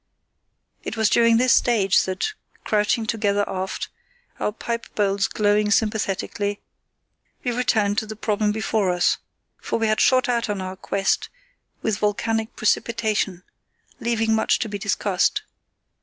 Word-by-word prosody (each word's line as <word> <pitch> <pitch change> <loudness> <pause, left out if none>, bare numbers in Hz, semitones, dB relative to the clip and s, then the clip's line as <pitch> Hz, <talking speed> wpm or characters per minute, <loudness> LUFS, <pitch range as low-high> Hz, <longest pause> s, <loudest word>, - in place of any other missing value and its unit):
It - - -5
was 220 -1 +2
during 230 -1 +5
this 250 +1 +4
stage 205 -6 +3
that, 190 - -2 0.3
crouching 210 +1 +1
together 205 -2 0
aft, 190 0 -4 0.5
our - - 0
pipe 230 +2 -4
bowls 200 -1 +1
glowing 210 0 +2
sympathetically, 205 -1 0 0.8
we 245 - 0
returned 215 -4 +1
to 220 - -6
the 215 - -6
problem 210 -1 0
before 215 -2 0
us; 180 0 +2 0.4
for - - -1
we 225 - 0
had 215 0 +2
shot 255 +1 +4
out 235 -2 0
on 205 -1 -1
our 185 0 -5
quest 195 +1 -1 0.5
with 215 -2 0
volcanic 220 +2 -1
precipitation, 215 -4 0 0.6
leaving 225 -1 +1
much 220 - +2
to 225 - -2
be 205 -1 -4
discussed. 200 - 0
215 Hz, 140 wpm, -23 LUFS, 200-225 Hz, 0.8 s, during